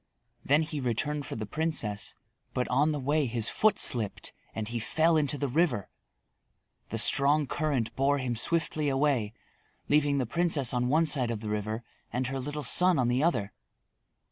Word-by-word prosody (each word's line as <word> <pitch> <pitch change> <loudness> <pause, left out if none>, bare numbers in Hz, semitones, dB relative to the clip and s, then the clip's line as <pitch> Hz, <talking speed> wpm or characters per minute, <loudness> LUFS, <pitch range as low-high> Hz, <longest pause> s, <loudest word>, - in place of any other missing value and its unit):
Then 145 +4 +3
he 155 -1 -4
returned 140 +3 -2
for - - -5
the 110 - -4
princess, 120 -6 -2 0.4
but 125 - 0
on 145 +5 +2
the 150 - -2
way 145 +2 +1
his 115 -1 -1
foot 215 -2 +2
slipped 110 -5 0 0.2
and 110 -1 -3
he 120 +1 -3
fell 160 +8 +2
into 145 -2 +1
the 140 - -1
river. 135 - 0 1.0
The - - -3
strong 145 +2 +4
current 135 -6 -2
bore 140 +2 +2
him 130 -3 -2
swiftly 155 +3 0
away, 135 -6 +1 0.6
leaving 145 -1 +3
the 130 - 0
princess 155 -2 +1
on 125 0 0
one 160 +4 +3
side 135 -6 +1
of 115 -3 -3
the 110 - -5
river 110 +2 -3 0.3
and 125 +1 -1
her 135 +1 -3
little 145 +3 -4
son 180 +7 +3
on 125 -2 +2
the 125 +2 +1
other. 105 - 0
135 Hz, 175 wpm, -29 LUFS, 120-150 Hz, 1.0 s, strong